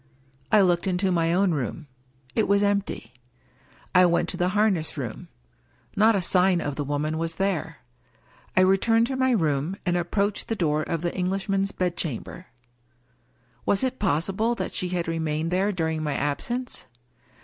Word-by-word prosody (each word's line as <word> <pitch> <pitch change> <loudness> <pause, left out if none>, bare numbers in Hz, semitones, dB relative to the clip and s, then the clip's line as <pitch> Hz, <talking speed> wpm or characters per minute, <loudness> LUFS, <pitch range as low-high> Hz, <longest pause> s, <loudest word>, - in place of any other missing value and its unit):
I 215 -2 +6
looked 175 -1 +2
into 185 +1 +1
my 165 -2 +2
own 185 +1 +3
room. 140 -3 -3 0.5
It - - +1
was 200 +1 +3
empty. 200 - -1 0.8
I 180 0 +6
went 170 0 +1
to - - -2
the 180 0 +1
harness 190 -8 +1
room. 120 -6 -5 0.7
Not 220 +2 +5
a 190 - 0
sign 180 0 +3
of 145 -3 -3
the 145 - -2
woman 150 +2 -2
was 165 0 -2
there. 175 -5 -2 0.8
I - - +7
returned 225 +5 +4
to 265 +2 -3
my 260 0 +2
room, 160 - +1
and 180 -1 +1
approached 200 +4 -1
the 225 - -1
door 155 -6 +1
of 165 +1 -3
the 175 - -1
Eng 180 -1 -1
lishman's 195 0 -1
bedchamber. 175 -2 -3 1.2
Was 200 - +1
it 260 0 -1
possible 195 +5 0
that - - -4
she 180 - -2
had 175 -2 -2
re 165 0 -2
mained 160 +1 -1
there 190 +3 +1
during 160 -4 -1
my 150 -2 -2
absence? 240 - -3
180 Hz, 170 wpm, -25 LUFS, 160-200 Hz, 1.2 s, I